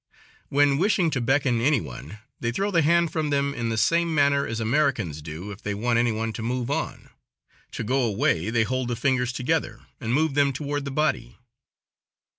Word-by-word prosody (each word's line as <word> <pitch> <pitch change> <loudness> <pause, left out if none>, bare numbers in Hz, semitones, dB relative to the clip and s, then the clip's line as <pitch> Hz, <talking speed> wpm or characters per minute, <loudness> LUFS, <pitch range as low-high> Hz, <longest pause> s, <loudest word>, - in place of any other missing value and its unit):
When 145 0 +3
wishing 185 -3 +2
to 135 - -1
beckon 130 -1 +1
any 140 +1 +3
one, 105 - -9 0.2
they 115 - -1
throw 195 +11 -1
the 170 -3 +3
hand 170 +2 +3
from 155 -2 -1
them 140 0 0
in 115 -3 -3
the 110 - -2
same 170 +7 +2
manner 140 -1 +3
as 115 - -3
Americans 115 - 0
do 80 +6 -7
if 100 - -10
they 105 0 -3
want 115 +3 +1
any 120 0 +2
one 110 +1 -2
to 110 - -6
move 125 +2 -2
on. - - -4 0.6
To - - -4
go 130 +5 +1
away, 110 - +1
they 115 -1 +2
hold 130 +2 -2
the 120 - -1
fingers 125 0 +1
together 130 +6 -2 0.2
and 115 -4 -3
move 155 +3 +2
them 140 -1 +2
toward 145 +1 -3
the - - -3
body. 150 - -1
130 Hz, 200 wpm, -25 LUFS, 115-145 Hz, 0.6 s, When